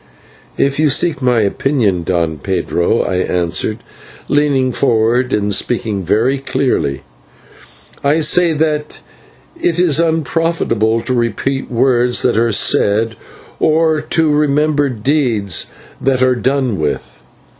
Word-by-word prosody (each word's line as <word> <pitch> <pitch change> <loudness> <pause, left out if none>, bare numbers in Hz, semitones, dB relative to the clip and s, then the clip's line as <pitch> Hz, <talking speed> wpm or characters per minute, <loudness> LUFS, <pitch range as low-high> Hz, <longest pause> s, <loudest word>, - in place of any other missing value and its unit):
"If 140 +1 0
you 155 -1 +3
seek 155 +2 +1
my 125 -3 +2
opinion, 105 -3 0
Don 85 -3 -1
Pedro," 85 +4 0
I 95 - -2
answered, 90 +4 -1 0.5
leaning 140 -3 +1
forward 120 0 +1
and 105 -1 0
speaking 110 -2 -1
very 120 +10 +1
clearly, 125 - -1 1.0
"I 145 +3 +2
say 165 +2 +3
that 150 -1 -2 0.6
it 175 0 0
is 165 -4 +3
unprofitable 160 -8 0
to 130 - -3
repeat 125 +3 -2
words 125 0 +2
that - - +2
are 115 +1 +2
said, 110 +2 +1 0.4
or 160 -1 +2
to 155 0 0
remember 150 0 +1
deeds 115 - 0 0.3
that 130 -1 +1
are 130 0 +3
done 130 - -1
with. 65 -5 -4
130 Hz, 120 wpm, -15 LUFS, 105-150 Hz, 1.0 s, you